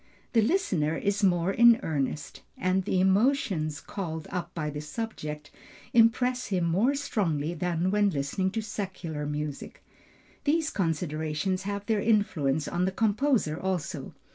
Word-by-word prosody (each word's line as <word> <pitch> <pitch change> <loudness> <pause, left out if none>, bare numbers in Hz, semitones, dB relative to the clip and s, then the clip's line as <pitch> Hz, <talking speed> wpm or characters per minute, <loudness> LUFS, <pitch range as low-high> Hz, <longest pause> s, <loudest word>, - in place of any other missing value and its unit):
The 230 - +5
listener 200 - +1
is 200 +1 0
more 175 -1 +3
in 235 +2 +6
earnest, 145 -1 -3 0.2
and 185 0 +1
the 185 - +1
emotions 190 - +2
called 160 -5 -5
up 175 -1 -3
by 155 -3 -2
the 150 0 -5
subject 150 -5 -5 0.4
impress 245 +2 +3
him 185 -4 0
more 205 +12 +2
strongly 170 - -1
than 175 +1 -1
when 205 0 +3
listening 150 +4 -1
to 225 - -2
secular 185 -8 -4
music. 150 -1 -5 0.6
These 315 +1 +1
considerations 160 +1 -1
have 200 0 -4
their 215 -1 +1
influence 160 -10 +1
on 175 +1 0
the 190 - 0
composer 215 - +1
also. 185 -4 -3
185 Hz, 140 wpm, -28 LUFS, 155-215 Hz, 0.6 s, in